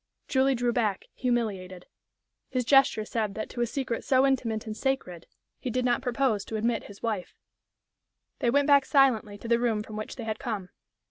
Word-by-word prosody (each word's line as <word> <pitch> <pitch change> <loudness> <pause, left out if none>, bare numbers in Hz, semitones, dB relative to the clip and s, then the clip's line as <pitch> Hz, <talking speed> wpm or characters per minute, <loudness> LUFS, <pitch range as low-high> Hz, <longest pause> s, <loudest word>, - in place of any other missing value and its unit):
Julie 265 0 +3
drew 240 0 0
back, 215 -5 0
humiliated. 200 -8 -2 0.6
His 250 -2 -1
gesture 270 -5 +4
said 215 -3 -2
that 215 - -5
to 240 - -4
a 240 - +2
secret 245 -2 -3
so 260 0 +4
intimate 235 -5 0
and 215 -1 -5
sacred 220 -11 -2 0.3
he 255 - -4
did 250 +1 -1
not 245 0 +2
propose 245 -4 0
to 220 - -5
admit 225 +1 0
his 200 - -13
wife. 215 -6 -3 1.0
They 240 - +2
went 285 +3 +3
back 280 -1 +6
silently 240 -7 +3
to 230 - -9
the 235 0 +3
room 225 -3 0
from 215 0 -8
which 215 - -5
they 240 - -6
had 220 -1 -3
come. 215 -9 -4
235 Hz, 190 wpm, -28 LUFS, 215-260 Hz, 1.0 s, back